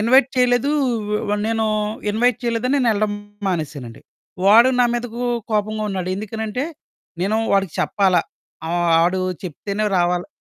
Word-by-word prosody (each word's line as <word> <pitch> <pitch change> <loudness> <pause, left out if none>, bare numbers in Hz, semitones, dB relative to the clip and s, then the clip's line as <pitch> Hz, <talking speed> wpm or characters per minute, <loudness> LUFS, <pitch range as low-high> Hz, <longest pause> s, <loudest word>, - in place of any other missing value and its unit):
Invite 250 +4 +5
చెయలేదూ, 250 +2 +3 0.6
వ 210 - +1
నేనూ 225 0 0 0.4
invite 235 +2 +2
చెయలేదని 245 +4 +1
నేనెళ్ళడం 215 -4 +1 0.4
మానేశానండి. 145 -9 -4 0.5
వాడు 230 +5 +7
నా - - +6
మీదకూ 240 0 -4 0.3
కోపంగా 215 0 0
ఉన్నాడు. 185 -2 -3
ఎందుకనంటే, 220 +4 -4 0.6
నేను 210 +3 +1 0.2
వాడికి 195 -4 +1
చెప్పాల, 195 -3 +2 0.5
ఆహ్, 175 0 +1
ఆడూ 180 +2 +1 0.2
చెప్తేనే 200 +5 -3
రావాలా 175 0 0
215 Hz, 120 wpm, -20 LUFS, 185-235 Hz, 0.6 s, వాడు